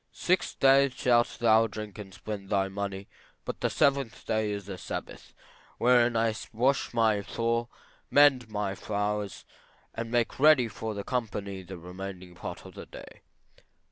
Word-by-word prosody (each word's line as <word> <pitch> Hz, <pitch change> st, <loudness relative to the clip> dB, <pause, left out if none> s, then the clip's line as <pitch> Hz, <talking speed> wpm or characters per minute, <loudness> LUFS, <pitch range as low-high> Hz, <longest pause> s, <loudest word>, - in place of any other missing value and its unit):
Six 185 Hz, +1 st, 0 dB
days 135 Hz, 0 st, +5 dB
shalt 120 Hz, -1 st, +2 dB
thou 115 Hz, -1 st, +5 dB
drink 105 Hz, -1 st, -8 dB
and 100 Hz, -2 st, -8 dB
spend 100 Hz, +1 st, -7 dB
all 100 Hz, -, +3 dB
thy 95 Hz, -, -4 dB
money, 100 Hz, 0 st, -4 dB, 0.4 s
but -, -, -5 dB
the -, -, +2 dB
seventh 140 Hz, -5 st, +1 dB
day 110 Hz, -1 st, 0 dB
is 100 Hz, -1 st, -4 dB
the 95 Hz, -2 st, -7 dB
Sabbath, -, -, -7 dB, 0.4 s
wherein 120 Hz, -1 st, +4 dB
I 115 Hz, 0 st, +2 dB, 0.2 s
wash 130 Hz, +5 st, +1 dB
my 110 Hz, -3 st, +2 dB
floor, 115 Hz, +3 st, -1 dB, 0.4 s
mend 140 Hz, -5 st, +5 dB
my 105 Hz, -2 st, -2 dB
fires 105 Hz, 0 st, -3 dB, 0.5 s
and 115 Hz, 0 st, -4 dB
make 120 Hz, +1 st, 0 dB
ready 145 Hz, -4 st, +6 dB
for 110 Hz, 0 st, -5 dB
the 100 Hz, -, -4 dB
company 105 Hz, -6 st, -3 dB
the 95 Hz, 0 st, -9 dB
remaining 90 Hz, +1 st, -8 dB
part 85 Hz, -, -8 dB
of -, -, -11 dB
the -, -, -10 dB
day. -, -, -12 dB
110 Hz, 160 wpm, -28 LUFS, 100-120 Hz, 0.5 s, ready